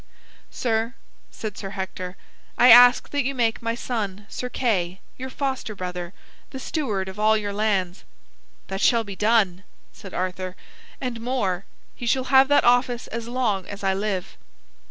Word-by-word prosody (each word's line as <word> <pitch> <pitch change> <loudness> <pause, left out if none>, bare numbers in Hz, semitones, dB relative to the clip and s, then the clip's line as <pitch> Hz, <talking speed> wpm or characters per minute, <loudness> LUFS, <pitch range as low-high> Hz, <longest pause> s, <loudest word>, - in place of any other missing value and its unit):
"Sir," 230 +1 -1 0.3
said 215 -3 -6
Sir 195 - -5
Hector, 185 -1 -5 0.4
"I 250 - +7
ask 245 +1 +8
that 285 -1 +1
you 275 +2 -2
make 230 -3 +1
my 230 0 -1
son 210 -5 -4
Sir 250 - -5
Kay, 190 -8 0 0.2
your 260 +1 -6
foster 260 -5 -3
brother, 180 -2 -5 0.4
the 265 - -8
steward 230 - -2
of 190 +2 -8
all 215 +1 +4
your 205 -1 -3
lands." 200 -4 0 0.6
"That 195 +1 -5
shall 230 0 +4
be 200 -2 -8
done," 205 -4 +2 0.3
said 195 - -11
Arthur, 185 0 -3 0.4
"and 245 -3 -4
more. 205 -7 -1 0.3
He 240 - -6
shall 260 +2 0
have 265 0 +8
that 290 - +4
office 245 0 +3
as 230 0 -5
long 235 -7 -1
as 205 0 -8
I 195 0 +2
live." 195 -2 -3
220 Hz, 160 wpm, -24 LUFS, 190-245 Hz, 0.6 s, ask